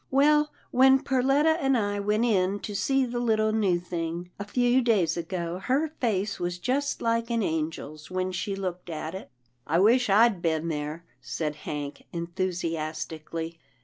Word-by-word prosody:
" -, -, -44 dB
Well, 300 Hz, 0 st, +4 dB, 0.2 s
when 265 Hz, +1 st, +6 dB
Perletta 275 Hz, +4 st, +3 dB
and 270 Hz, -1 st, +3 dB
I 205 Hz, -2 st, -1 dB
went 210 Hz, +3 st, +1 dB
in 195 Hz, -3 st, +2 dB
to 210 Hz, -, -5 dB
see 270 Hz, +7 st, +2 dB
the 240 Hz, 0 st, -3 dB
little 220 Hz, -2 st, +2 dB
new 200 Hz, -5 st, +2 dB
thing, 170 Hz, 0 st, -4 dB
a -, -, -2 dB
few 245 Hz, +4 st, +2 dB
days 200 Hz, -9 st, +2 dB
ago, 170 Hz, 0 st, -3 dB
her 270 Hz, +9 st, +1 dB
face 210 Hz, -4 st, 0 dB
was 175 Hz, 0 st, -2 dB
just 270 Hz, +9 st, -1 dB
like 230 Hz, 0 st, +1 dB
an 230 Hz, -2 st, +1 dB
angel's 155 Hz, -2 st, -3 dB
when 185 Hz, 0 st, -1 dB
she 195 Hz, +2 st, -3 dB
looked 180 Hz, -2 st, -5 dB
at 160 Hz, 0 st, -4 dB
it." 190 Hz, -, -8 dB, 0.2 s
" 125 Hz, -, -45 dB
I 160 Hz, -, +2 dB
wish 230 Hz, +6 st, +4 dB
I'd 210 Hz, -2 st, +5 dB
been 160 Hz, 0 st, 0 dB
there," 155 Hz, +2 st, -4 dB, 0.2 s
said 150 Hz, -2 st, -3 dB
Hank, 145 Hz, -1 st, -6 dB
enthusias 170 Hz, -3 st, -2 dB
tically. 165 Hz, +1 st, -6 dB
190 Hz, 175 wpm, -27 LUFS, 165-235 Hz, 0.2 s, when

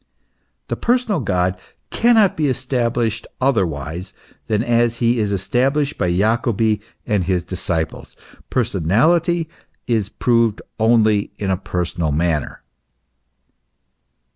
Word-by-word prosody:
The -, -, -2 dB
personal 240 Hz, -6 st, +1 dB
God 90 Hz, -5 st, 0 dB, 0.3 s
cannot 225 Hz, -4 st, +4 dB
be 155 Hz, -2 st, 0 dB
established 120 Hz, -4 st, -1 dB
otherwise 90 Hz, -, -1 dB, 0.3 s
than 110 Hz, 0 st, +1 dB
as 120 Hz, 0 st, +2 dB
he 120 Hz, 0 st, +1 dB
is 105 Hz, -2 st, 0 dB
established 135 Hz, +9 st, 0 dB
by 90 Hz, -3 st, +1 dB
Jacobi 110 Hz, +2 st, +1 dB, 0.2 s
and 105 Hz, -6 st, 0 dB
his 90 Hz, -1 st, 0 dB
disciples. 85 Hz, -3 st, -4 dB, 0.3 s
Personality 135 Hz, -, +2 dB, 0.4 s
is 110 Hz, -5 st, 0 dB
proved 115 Hz, -2 st, +1 dB, 0.2 s
only 110 Hz, -2 st, +3 dB
in 100 Hz, -2 st, -2 dB
a -, -, +2 dB
personal 85 Hz, -3 st, -2 dB
manner. 80 Hz, -1 st, -1 dB
110 Hz, 105 wpm, -20 LUFS, 95-125 Hz, 0.4 s, cannot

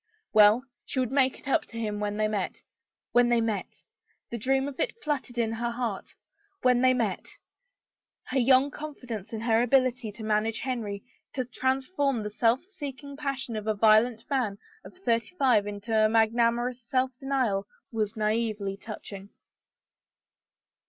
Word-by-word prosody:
Well, 215 Hz, +3 st, +7 dB, 0.2 s
she 260 Hz, -, -3 dB
would 255 Hz, -2 st, 0 dB
make 265 Hz, -1 st, +2 dB
it -, -, -14 dB
up 275 Hz, -, +2 dB
to 230 Hz, -, -10 dB
him 210 Hz, -2 st, -2 dB
when 210 Hz, 0 st, -2 dB
they 215 Hz, 0 st, +2 dB
met. 205 Hz, -3 st, -3 dB, 0.5 s
When 240 Hz, 0 st, +4 dB
they 240 Hz, -1 st, +4 dB
met! 225 Hz, -3 st, -3 dB, 0.5 s
The 235 Hz, -, -3 dB
dream 270 Hz, +4 st, +1 dB
of 280 Hz, -2 st, -8 dB
it -, -, -1 dB
fluttered 275 Hz, -5 st, -2 dB
her 230 Hz, 0 st, 0 dB
heart. 235 Hz, -5 st, -4 dB, 0.5 s
When 250 Hz, -1 st, +4 dB
they 255 Hz, 0 st, +6 dB
met 230 Hz, -7 st, -1 dB, 1.0 s
I 265 Hz, -, 0 dB
Her -, -, +5 dB
young 260 Hz, +3 st, +5 dB
confidence 250 Hz, -9 st, -7 dB
in 220 Hz, -1 st, -4 dB
her 230 Hz, 0 st, +3 dB
ability 250 Hz, -2 st, +2 dB
to 220 Hz, +2 st, -9 dB
manage 215 Hz, +1 st, 0 dB
Henry, 220 Hz, -6 st, -3 dB, 0.3 s
to 255 Hz, -2 st, -2 dB
transform 265 Hz, -, 0 dB
the 210 Hz, -, -4 dB
self 230 Hz, +4 st, +2 dB
seeking 285 Hz, -7 st, -8 dB
passion 275 Hz, -5 st, -3 dB
of 215 Hz, 0 st, -4 dB
a 215 Hz, -, +1 dB
violent 220 Hz, +2 st, +4 dB
man 245 Hz, -8 st, 0 dB, 0.3 s
of -, -, -13 dB
thirty 235 Hz, -1 st, -1 dB
five 245 Hz, -, +3 dB
into 215 Hz, +1 st, +1 dB
magnanimous 235 Hz, +2 st, +2 dB
self 255 Hz, +1 st, 0 dB
denial 255 Hz, -8 st, 0 dB, 0.2 s
was 215 Hz, -1 st, -1 dB
naively 215 Hz, -2 st, -1 dB
touching. 200 Hz, -2 st, -9 dB
235 Hz, 155 wpm, -28 LUFS, 215-260 Hz, 1.0 s, Well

